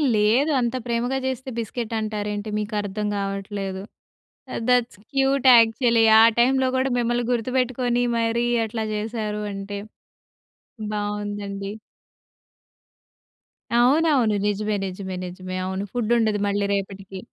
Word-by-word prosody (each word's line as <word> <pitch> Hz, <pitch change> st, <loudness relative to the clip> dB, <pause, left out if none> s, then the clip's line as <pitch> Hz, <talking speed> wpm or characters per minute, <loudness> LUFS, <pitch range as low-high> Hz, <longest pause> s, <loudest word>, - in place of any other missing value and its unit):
లేదు 225 Hz, +9 st, +3 dB
అంత 240 Hz, 0 st, -1 dB
ప్రేమగా 240 Hz, +2 st, -1 dB
చేస్తే 260 Hz, 0 st, -3 dB
బిస్కెట్ 230 Hz, 0 st, -4 dB
అంటారేంటి, 210 Hz, -1 st, -3 dB
మీకర్థం 210 Hz, -1 st, -2 dB
కావట్లేదు. 195 Hz, -1 st, -4 dB, 0.7 s
ఆహ్, -, -, -3 dB
దట్స్ 245 Hz, -4 st, +2 dB
క్యూట్ 270 Hz, -1 st, +2 dB
యాక్చువల్లి. 230 Hz, 0 st, +4 dB, 0.2 s
ఆ -, -, +8 dB, 0.2 s
టైంలో 260 Hz, +2 st, +3 dB
కూడా 260 Hz, +1 st, +1 dB
మిమ్మల్ని 240 Hz, 0 st, 0 dB
గుర్తుపెట్టుకొని 245 Hz, 0 st, 0 dB
మరి 230 Hz, +1 st, +1 dB, 0.2 s
అట్లా 220 Hz, 0 st, -3 dB
చేశారు 210 Hz, -1 st, -3 dB
అంటే, 200 Hz, +1 st, -5 dB, 1.2 s
బావుందండి. 205 Hz, -1 st, -4 dB, 2.1 s
అవునవును 265 Hz, -3 st, +3 dB
నిజమే, 210 Hz, +1 st, -1 dB
నిజమే, 190 Hz, 0 st, -5 dB
నిజమే. 185 Hz, +1 st, -7 dB
అవును 190 Hz, +1 st, -3 dB
ఫుడ్ 240 Hz, -2 st, -1 dB
ఉండదు 215 Hz, -2 st, +1 dB
మళ్ళీ 200 Hz, 0 st, 0 dB
రేపటికి. 195 Hz, -1 st, -5 dB
215 Hz, 105 wpm, -23 LUFS, 205-245 Hz, 2.1 s, ఆ